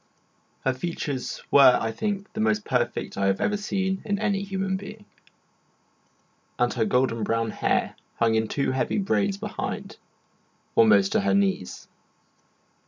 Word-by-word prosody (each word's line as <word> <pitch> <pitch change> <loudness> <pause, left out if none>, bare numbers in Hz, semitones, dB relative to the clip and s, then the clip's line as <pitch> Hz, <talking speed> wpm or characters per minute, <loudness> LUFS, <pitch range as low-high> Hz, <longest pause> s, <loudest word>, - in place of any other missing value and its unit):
Her 130 - +2
features 140 -2 -4
were, 135 -3 +7
I 115 - -2
think, 200 - -4
the - - -5
most 215 -1 +1
perfect 125 -2 -1
I 100 - +2
have 95 0 +1
ever 210 - +1
seen 190 -2 -2
in 205 -1 -1
any 200 -2 0
human 195 -1 -2
being, 205 +2 -8 1.5
and 120 0 +1
her 115 -3 0
golden 125 -2 +1
brown 115 +1 0
hair - - 0 0.2
hung 115 -1 +2
in 110 0 +1
two 140 +1 -1
heavy 130 - -1
braids 200 -1 0
behind, 210 -1 -5 0.8
almost 105 -4 +5
to - - +2
her 100 0 +2
knees. 95 -2 -1
135 Hz, 145 wpm, -25 LUFS, -, 1.5 s, were